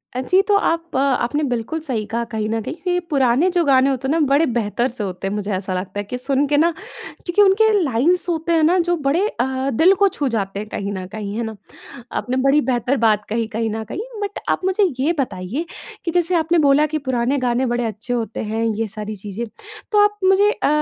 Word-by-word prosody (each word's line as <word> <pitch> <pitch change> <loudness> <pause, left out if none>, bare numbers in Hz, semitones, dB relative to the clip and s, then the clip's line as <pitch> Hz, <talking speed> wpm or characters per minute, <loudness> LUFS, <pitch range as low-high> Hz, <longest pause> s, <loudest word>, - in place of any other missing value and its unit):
अ, - - -1
जी 365 +9 +3
तो 405 +1 +1
आप 335 -3 -1
अ 260 - +2 0.2
आपने 295 +5 -1
बिल्कुल 245 +7 -2
सही 225 -6 -2
कहा 235 +1 -1
कहीं 215 -1 -2
न 225 0 -1
कहीं 320 - -5 0.2
ये 355 - +2
पुराने 275 +4 +3
जो 350 - +3
गाने 270 -1 +4
होते 265 -1 -2
हैं 275 - 0
ना 330 - +2
बड़े 285 +4 +3
बेहतर 235 +2 0
से 235 -4 -3
होते 190 0 -4
हैं 195 - -2
मुझे 210 0 -3
ऐसा 185 0 -3
लगता 185 +2 -4
है - - -2
कि 225 +5 -5
सुन 270 +2 +1
के 290 - +2
ना 330 +3 +4 0.5
क्योंकि 350 +3 +2
उनके 410 +2 +5
लाइन्स 305 +8 +2
होते 335 0 0
हैं 325 -1 +3
ना 345 +4 +4
जो 350 - +2
बड़े 345 +9 +2
अ, 265 - -2
दिल 345 +11 +5
को 400 +1 +4
छू 285 - -1
जाते 195 -1 -2
हैं 215 - -6
कहीं 200 -1 -4
न 185 -2 -5
कहीं 210 0 -6
है 235 - -1
ना? 220 -1 -5 0.6
आपने 255 +1 -2
बड़ी 285 +2 +5
बेहतर 255 0 0
बात 210 -1 +2
कही 225 +1 -1
कहीं 225 0 -1
न 220 +1 -4
कहीं 220 - -6 0.2
बट 405 0 -3
आप - - +1
मुझे 380 +2 +2 0.2
ये 305 +6 +2
बताइए 230 - -3 0.4
कि 335 - -1
जैसे 355 +1 +1
आपने 335 +1 +2
बोला 290 0 +4
कि 310 +1 -2
पुराने 255 +2 +1
गाने 250 0 0
बड़े 240 0 -1
अच्छे 225 +2 -4
होते 230 -2 -3
हैं, 220 +2 -2
ये 225 0 -1
सारी 215 +1 -6
चीज़ें। 205 +4 -6 0.5
तो 420 - +4
आप 415 0 0
मुझे 390 +2 +5
अ, - - -1
260 Hz, 235 wpm, -20 LUFS, 220-330 Hz, 0.6 s, उनके